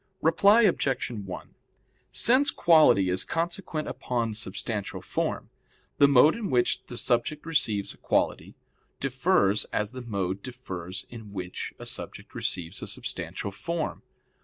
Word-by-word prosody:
Reply 200 +7 +6
Obj. 135 - +1
1: 100 -5 -7 0.6
Since 260 +4 +4
quality 155 - +5
is 95 +1 0
consequent 165 -1 -2
upon 115 -3 -2
substantial 105 0 -4
form, - - -3 0.5
the 140 - +8
mode 140 +3 +6
in 230 -4 -3
which 120 -1 +2
the 120 - -7
subject 125 +7 0
receives 115 -11 0
a - - -20
quality - - 0 0.4
differs 125 - +2
as 105 0 -2
the 130 0 -7
mode 100 -5 -2
differs 95 -8 -7
in 110 -4 -10
which 90 -2 -5
a - - -9
subject - - -6
receives 90 0 -3
a - - -5
substantial 100 - -4
form. 165 +10 -3
120 Hz, 135 wpm, -27 LUFS, 100-155 Hz, 0.6 s, the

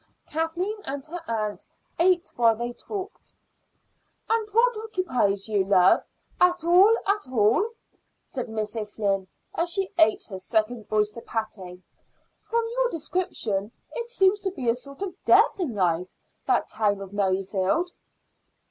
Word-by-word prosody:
Kathleen 340 +7 -2
and 275 0 -5
her 345 +2 -6
aunt 215 -2 -2 0.4
ate 355 0 +3
while 230 -2 +4
they 240 +2 -4
talked. 400 - -7 0.9
"And 445 -1 0
what 470 +3 +3
occupies 295 - -1
you, 205 -3 +2
love, 190 -1 +5 0.4
at 360 -1 +3
all 375 +7 +6
at 405 -5 0
all?" 235 - +3 0.6
said 250 -4 -5
Miss 215 0 -3
O'Flynn 205 -3 -1 0.3
as 340 +1 0
she 385 +2 0
ate 220 -10 +4
her 190 - -5
second 220 +3 -1
oyster 210 +2 +1
patty. 190 -6 -5 0.6
"From 465 0 -1
your - - +1
description 240 - -1 0.2
it 475 -1 -4
seems 400 -3 +3
to 385 - 0
be 275 -10 -6
a - - +4
sort 280 +7 -7
of 385 - -4
death - - +5
in 295 - -2
life, 180 -2 0 0.3
that - - +2
town 210 -2 0
of 195 0 -9
Merrifield." 195 - 0
245 Hz, 140 wpm, -25 LUFS, -, 0.9 s, all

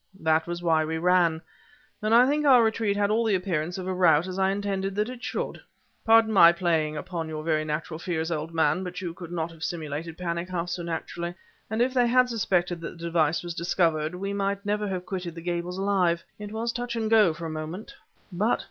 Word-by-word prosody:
"That 160 0 +2
was 175 0 -4
why 160 -2 +3
we 160 +1 -2
ran. 170 -2 +2 0.6
But 215 +1 -1
I 240 +2 +7
think 295 +2 +1
our 260 -5 +6
retreat 220 -2 0
had 205 0 +1
all 225 +2 +2
the 220 -3 +2
appearance 175 -2 -2
of 185 - -5
a 185 - -2
rout, 170 -3 +4
as 185 0 -5
I 190 0 +3
intended 195 -1 -2
that 210 +3 0
it 250 -1 -10
should. - - -4 0.4
Pardon 225 -1 +5
my 170 -4 +8
playing 165 -3 0
upon 165 -2 -4
your 155 -1 -5
very 155 -1 +1
natural 155 +1 -4
fears, 165 -1 -2
old 160 0 -3
man, 165 +3 +1
but 180 -1 -5
you 175 -3 -4
could 170 -1 -10
not 165 -1 -3
have 160 -1 -11
simulated 160 -1 -4
panic 170 0 -3
half 175 -1 -3
so 180 - -3
naturally! 170 +1 -4 0.3
And 220 +3 +1
if 255 +1 -1
they 245 -2 +3
had 250 +1 +4
suspected 180 -6 0
that 165 - -7
the 165 - -11
device 165 -1 +1
was 175 -1 -5
discovered, 165 -2 0
we 195 +2 -3
might 200 0 -2
never 210 0 0
have 185 -2 -4
quitted 180 -3 -5
the 165 - -7
Gables 175 +1 -3
alive. 185 -4 +1 0.2
It 210 0 -7
was 230 +2 -2
touch 240 0 -4
and 225 -1 -1
go 215 -5 +5
for 165 +1 -7
a 160 - -4
moment." 155 +6 -6 0.4
"But..." 205 +6 +1
180 Hz, 225 wpm, -26 LUFS, 165-205 Hz, 0.6 s, my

